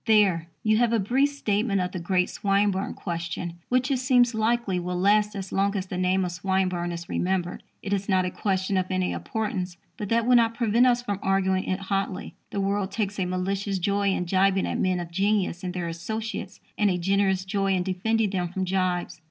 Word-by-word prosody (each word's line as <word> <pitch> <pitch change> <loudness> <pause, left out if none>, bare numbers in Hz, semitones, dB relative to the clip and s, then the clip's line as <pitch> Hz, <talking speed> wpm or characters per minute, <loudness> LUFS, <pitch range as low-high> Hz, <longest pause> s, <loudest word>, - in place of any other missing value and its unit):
There 195 -7 +4 0.2
you 215 0 +3
have 235 0 +2
a - - +4
brief 260 +8 +2
statement 210 -6 0
of 180 0 -1
the 185 - -4
great 180 +1 +1
Swinburne 200 -1 0
question, 170 0 -4
which, 255 +2 +2
it 265 - +1
seems 250 -2 +4
likely, 220 -3 +1
will 180 0 -3
last 210 +2 +3
as 195 -1 -5
long 200 +1 +1
as 190 - -2
the 185 - -6
name 185 +1 +2
of 180 - -3
Swinburne 180 -1 -1
is 170 0 -6
remembered. 180 -1 -1 0.2
It 200 - -2
is 200 0 -2
not 185 -1 +3
a 180 - -2
question 190 0 -1
of 185 0 0
any 185 -1 0
importance; 190 -5 -3 0.2
but 205 - -5
that 230 0 +2
will 250 0 +5
not 230 -1 +3
prevent 235 +1 +3
us 245 -1 +2
from 205 -5 -3
arguing 190 -1 +1
it 185 +1 -2
hotly. 195 -1 -2 0.2
The 200 - -3
world 195 0 0
takes 205 -1 -2
a 185 - +1
malicious 195 +2 -1
joy 200 +2 0
in 185 -2 0
jibing 190 +1 +2
at - - -2
men 185 -1 +1
of 170 -1 -6
genius 195 -1 0
and 180 - -2
their 180 -1 -3
associates, 220 +7 -5 0.2
and 210 -1 +4
a 180 - +1
generous 190 +1 +1
joy 195 -1 +1
in 180 - 0
defending 205 +3 0
them 180 -3 -1
from 185 +2 -3
jibes. 180 -2 -1
195 Hz, 210 wpm, -26 LUFS, 185-210 Hz, 0.2 s, will